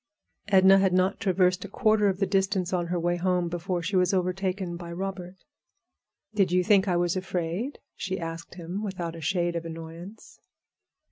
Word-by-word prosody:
Edna 195 -1 +6
had 190 -2 +2
not 185 +1 +2
traversed 185 -3 +2
a - - -6
quarter 215 -1 +3
of 190 - -1
the 195 - +1
distance 190 -1 0
on 175 -2 0
her 175 0 -1
way 175 +1 0
home 180 -1 0
before 175 +1 -3
she 180 +4 -2
was 180 +1 +3
overtaken 185 0 -1
by 170 0 -8
Robert. 185 0 -5 1.0
"Did 195 -4 +2
you 180 0 +3
think 200 0 +4
I 180 -2 +2
was 175 0 +1
afraid?" 185 - -3 0.2
she 190 0 -3
asked 165 0 -6
him, 175 +3 -5
without 180 -5 -4
a 165 - -8
shade 175 +1 0
of 170 - -2
annoyance. 165 +5 -9
180 Hz, 180 wpm, -27 LUFS, 175-195 Hz, 1.0 s, Edna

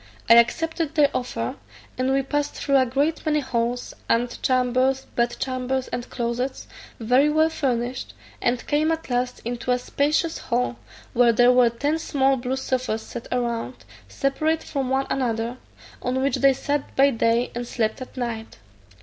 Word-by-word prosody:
I - - +8
accepted 315 +7 +2
their 295 -2 +4
offer, 120 - -3 0.4
and 255 +1 0
we 270 0 +2
passed 290 +2 -2
through 275 -1 +2
a 260 -1 +3
great 285 +6 0
many 300 -1 +2
halls, 240 -2 -2 0.2
ante 240 +1 +1
chambers, 255 +1 +2
bed 240 0 +1
chambers, 260 0 -2
and 245 0 -5
closets, 245 +2 -3 0.3
very 250 +6 +3
well 315 +1 +3
furnished, 250 -4 -2 0.3
and 245 0 0
came 310 +2 +2
at 325 -5 -3
last 250 +1 -1
into 240 +1 -4
a 250 - +4
spacious 300 +6 0
hall, 245 0 -1 0.4
where 240 0 +5
there 245 +2 +6
were 250 -1 +5
ten 285 +7 -1
small 270 -3 +2
blue 255 +1 -2
sofas 255 -4 -2
set 240 - -8
round, 240 0 -2 0.2
separate 310 +4 0
from 270 -3 -3
one 265 +1 +1
another, 235 -2 -1 0.4
on 255 +1 -1
which 275 - +1
they 275 -1 +5
sat 285 +2 -3
by 275 +1 +5
day 230 0 +1
and 240 0 -4
slept 225 +1 -1
at 255 - -9
night. 230 -3 -4
255 Hz, 165 wpm, -24 LUFS, 240-275 Hz, 0.4 s, I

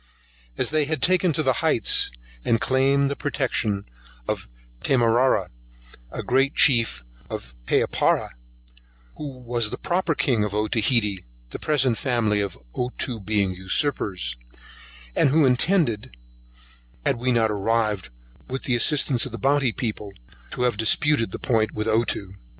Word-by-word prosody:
As - - +2
they 155 -1 +2
had 155 0 -2
taken 180 +5 +3
to 155 - 0
the 130 -2 +2
heights, - - +3 0.3
and 115 - +2
claimed 135 +2 +2
the 140 - -2
protection 105 -8 -1 0.4
of - - -3 0.3
Tamarrah, 120 -5 +2 0.6
a - - -5
great 135 +3 +1
chief 115 - +3 0.3
in - - -2 0.3
Papara, - - +1 0.9
who 150 - -5
was 120 -3 -1
the - - -5
proper 175 -2 -1
king 120 -8 +1
of 105 -1 -3
Otaheitee, 105 -2 +1 0.3
the - - -6
present 135 -6 +1
family 115 -5 +1
of 100 -7 -4 0.2
Ottoo 125 -1 -3
being 100 -2 0
usurpers, 95 - -1 0.8
and - - +3
who 150 +2 +4
intended, 125 - +1 0.9
had - - +1
we 125 +2 0
not 115 -2 +2
arrived 105 -3 -1 0.4
with 130 +1 -5
the 125 -4 0
assistance 130 0 +4
of - - -10
the 115 - -6
Bounty's 135 0 +1
people, 105 -5 -4 0.4
to 125 - -3
have 120 -4 +1
disputed 115 +2 +2
the - - -5
point 110 -3 0
with 110 +1 -3
Ottoo. 110 -4 0
120 Hz, 140 wpm, -23 LUFS, 105-135 Hz, 0.9 s, who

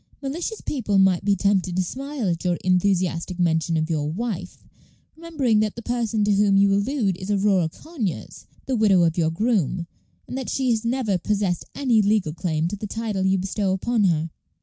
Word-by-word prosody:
Malicious 335 +10 -4
people 220 -8 -1
might 190 -2 +4
be 200 0 +2
tempted 190 -2 +1
to 185 - +1
smile 270 +3 -4
at 170 -2 -1
your 175 -2 +1
enthusiastic 180 -1 +1
mention 165 -1 +1
of 155 0 0
your 150 -3 -1
'wife,' 185 -2 -5 0.5
remembering 305 -9 0
that 215 -1 0
the 235 - -8
person 230 -3 -1
to 205 0 +3
whom 200 0 +3
you 200 0 +4
allude 200 -1 0
is 185 +2 -7
Aurora 195 -4 +2
Conyers, 235 - -6 0.2
the 265 - -1
widow 200 -6 +4
of 165 -1 +2
your 165 -2 +1
groom, 180 - 0 0.4
and - - -6
that 265 -1 -4
she 260 -2 0
has 225 -1 0
never 230 -6 0
possessed 200 -2 -1
any 245 -6 +3
legal 205 -6 +1
claim 165 -2 -1
to 205 - -4
the 210 +1 -6
title 210 -3 -2
you 190 0 +3
bestow 190 +1 -1
upon 215 +3 +1
her." 165 -2 +1
200 Hz, 190 wpm, -23 LUFS, 180-230 Hz, 0.5 s, might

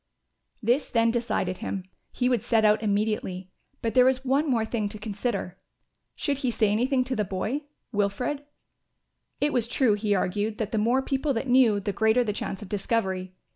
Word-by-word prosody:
This 245 +6 +2
then 230 -1 +3
decided 215 -6 -1
him. 195 -2 -4 0.3
He 250 - 0
would 245 -4 +2
set 225 -1 +2
out 215 0 +4
immediately; 205 -3 -1 0.3
but 225 -2 0
there 250 +1 +6
was 260 0 +2
one 280 +4 +2
more 230 -4 +2
thing 220 -2 -2
to 215 - -8
consider. 205 -3 -3 0.6
Should 280 -2 -1
he 260 - 0
say 220 -3 +2
anything 255 +5 +2
to 255 0 -3
the 210 - +1
boy, 215 +10 -3 0.3
Wilfred? 230 +7 -1 1.0
It 295 +1 +1
was 235 -3 +2
true, 245 -2 +2
he 205 0 +1
argued, 205 +3 -1
that 215 -2 -3
the 220 - +1
more 240 +5 +2
people 270 +1 0
that 230 - -2
knew, 245 -5 +5
the 200 0 -3
greater 220 +3 +3
the 210 -3 -2
chance 200 0 -4
of - - -9
discovery. 190 -3 -1
225 Hz, 185 wpm, -26 LUFS, 205-250 Hz, 1.0 s, there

